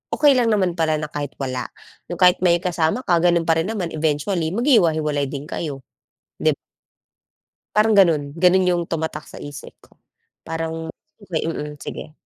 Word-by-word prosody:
okey 285 -4 +5
lang 240 - +2
naman 200 -5 +2
pala 160 -1 +2
na 150 -1 -4
kahit 145 -1 -5
wala. 130 -3 -4 0.4
Yung 175 - -5
kahit 180 -1 +5
may 175 -1 +2
kasama 180 +6 0
ka, 175 -1 +2
gano'n 170 -1 +3
pa 165 0 +2
rin 165 - -1
naman. 200 -6 -3
Eventually, 160 +3 -1
maghiwahiwalay 160 - +2
din 140 +1 -6
kayo. 145 -3 -5 0.5
Dib - - +1 1.2
Parang 215 +1 +4
gano'n, 155 -7 +3
gano'n 180 +2 +4
yung 175 -1 +2
tumatak 160 -2 -4
sa - - -10
isip 145 -1 -9
ko. - - -24 0.5
Parang 165 0 -4 0.3
okey, 175 -6 -3
mm, 150 -2 -5
sige. 155 - -7
165 Hz, 160 wpm, -21 LUFS, 150-180 Hz, 1.2 s, okey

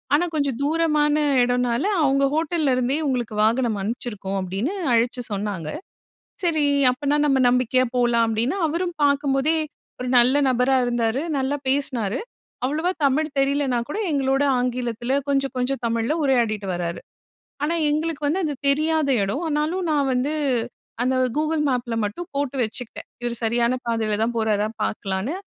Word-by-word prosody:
ஆனா, 330 +4 +2
கொஞ்சம் 280 -5 0
தூரமான 300 -1 +2 0.3
இடம்னால 245 +2 +1 0.2
அவுங்க 275 0 +3
ஹோட்டல்ல 315 -3 +1
இருந்தே 255 +3 0
உங்களுக்கு 240 -5 -2
வாகனம் 230 -1 +2
அனுப்பிச்சிருக்கோம். 210 -3 -4
அப்பிடின்னு 195 - -2 0.2
அழச்சு 240 +2 +1
சொன்னாங்க. 195 -6 -3 0.7
சரி 315 -4 +2 0.3
அப்பன்னா 285 +3 0
நம்ம 270 -2 +3
நம்பிக்கையா 250 +1 +2
போலாம். 240 -1 +3
அப்பிடின்னு 230 - 0
அவரும் 345 +3 -2
பார்க்கும்போதே, 280 +2 +2 0.4
1 250 - -3
நல்ல 250 +3 +4
நபரா 255 +2 +2
இருந்தாரு, 240 +2 0 0.2
நல்லா 270 +2 -1
பேசினாரு. 255 -6 -1 0.5
அவ்வளவா 315 +7 0
தமிழ் 300 +3 +2
தெரியலனா 275 -2 +1
கூட 345 - -3
எங்களோட 270 0 +1 0.2
ஆங்கிலத்தில 245 0 -1
கொஞ்சம், 275 -1 +1
கொஞ்சம் 255 +2 -1
தமிழ்ல 230 +4 0
உரையாடிட்டு 230 -7 +1
வராரு. 170 -1 -3 0.6
ஆனா, 325 +3 +1 0.2
எங்களுக்கு 305 0 -2
வந்து 345 +6 0
அது 300 -2 -1
தெரியாத 310 +1 +2
இடம் 200 - -2
ஆனாலும் 315 +4 -1
நான் 285 -2 +1
வந்து 265 +5 0 0.7
அந்த 260 +1 +1 0.2
Google 310 +1 0
Mapல 245 -2 -1
மட்டும் 220 +13 -5
போட்டு 280 -1 -2
வச்சுக்கிட்டேன். 225 +1 -6 0.2
இவரு 240 -1 -2
சரியான 235 +2 +1
பாதையில 220 -2 0
தான் 235 +1 0
போறாரா 215 -2 +1 0.2
பார்க்கலான்னு. 195 - -2
260 Hz, 140 wpm, -23 LUFS, 235-290 Hz, 0.7 s, நல்ல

